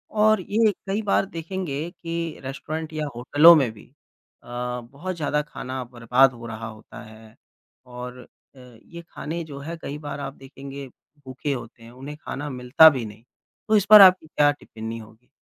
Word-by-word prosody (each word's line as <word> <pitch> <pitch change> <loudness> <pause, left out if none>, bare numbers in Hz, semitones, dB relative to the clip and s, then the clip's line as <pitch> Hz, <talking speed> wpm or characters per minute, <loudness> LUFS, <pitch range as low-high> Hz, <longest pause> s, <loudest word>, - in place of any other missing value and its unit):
और 215 -1 +4
ये 215 +3 +2 0.2
कई 200 +3 -1
बार 200 -1 +1
देखेंगे 165 -3 -5
कि 165 -2 -5
रेस्टोरेंट 155 +4 -6
या 155 -1 -2
होटलों 145 +7 +7
में 130 -7 +2
भी 105 - -16 0.6
अ, - - -19
बहुत 125 +8 -5
ज़्यादा 150 -2 -1
खाना 130 -3 -6
बर्बाद 125 +2 +2
हो 115 0 -11
रहा 110 0 -6
होता 110 -1 -12
है 110 0 -15 0.5
और 125 0 -8 0.4
अ, - - -16
ये 125 +7 -13
खाने 165 +2 -5
जो 140 -3 -9
है 165 +4 -7
कई 145 +2 -6
बार 145 - -5
आप 135 -1 -5
देखेंगे 135 0 -10 0.4
भूखे 130 +3 -4
होते 120 -2 -9
हैं 115 - -13
उन्हें 135 +4 -9
खाना 145 +2 -5
मिलता 130 +5 +6
भी 130 -6 -3
नहीं 105 +2 -12 0.4
तो 215 - +3
इस 205 -2 +3
पर 210 -1 +11
आपकी 185 -4 +7
क्या 145 -1 +3
टिप्पणी 115 -5 -8
होगी? 110 +2 -16
140 Hz, 175 wpm, -24 LUFS, 125-165 Hz, 0.6 s, पर